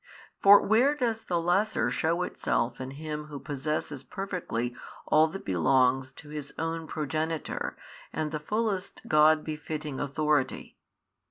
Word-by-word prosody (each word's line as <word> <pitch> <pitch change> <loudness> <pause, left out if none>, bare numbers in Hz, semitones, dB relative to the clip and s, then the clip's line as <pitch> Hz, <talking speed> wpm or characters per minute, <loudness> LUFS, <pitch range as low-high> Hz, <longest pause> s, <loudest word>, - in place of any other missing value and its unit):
For 200 +1 +9
where 245 +8 +4
does 230 -5 -1
the 175 -2 0
lesser 180 +6 +1
shew 170 +2 +1
itself 115 -6 -1
in 130 - -5
Him 150 0 -5
who 150 -1 -8
possesses 145 -1 -3
perfectly 130 - -3 0.3
all 155 +1 +5
that 180 +5 -8
belongs 130 - +2
to 150 - -12
His 150 -1 -6
own 165 0 -3
Progenitor 155 +1 -3 0.3
and 155 -1 -2
the 155 - -2
fullest 205 +3 -2
God 155 0 +5
befitting 150 -2 -5
Authority? 150 -1 0
155 Hz, 135 wpm, -28 LUFS, 145-175 Hz, 0.3 s, For